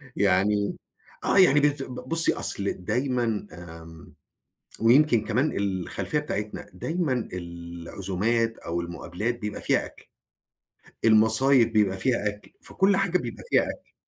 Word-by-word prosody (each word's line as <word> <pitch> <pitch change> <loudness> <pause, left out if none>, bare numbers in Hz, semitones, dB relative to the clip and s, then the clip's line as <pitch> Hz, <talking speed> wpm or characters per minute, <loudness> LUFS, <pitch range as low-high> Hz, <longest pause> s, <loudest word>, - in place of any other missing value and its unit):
يعني، 100 +1 +1 0.5
آه - - +2
يعني 165 -7 +6
بت 145 -1 +1
ب 125 - -8
بُصّي، 165 0 +2
أصل 100 0 -2
دايمًا 120 +1 -1
آمم 80 -1 -12 0.7
ويمكن 120 0 +4
كمان 125 +8 0
الخلفيّة 100 - -2
بتاعتنا، 105 -8 -5
دايمًا 155 -8 -2
العزومات 90 +6 -3
أو 85 +1 -3
المقابلات 90 +7 -4
بيبقى 105 -3 -5
فيها - - +1
أكْل، - - -16 1.0
المصايب 115 +3 +5
بيبقى 105 -3 +2
فيها 115 0 +1
أكْل، 105 0 -9
في - - -8
كل 195 0 +3
حاجة 185 -2 +1
بيبقى - - -7
فيها - - +4
أكْل. - - -8
110 Hz, 130 wpm, -26 LUFS, 95-130 Hz, 1.0 s, يعني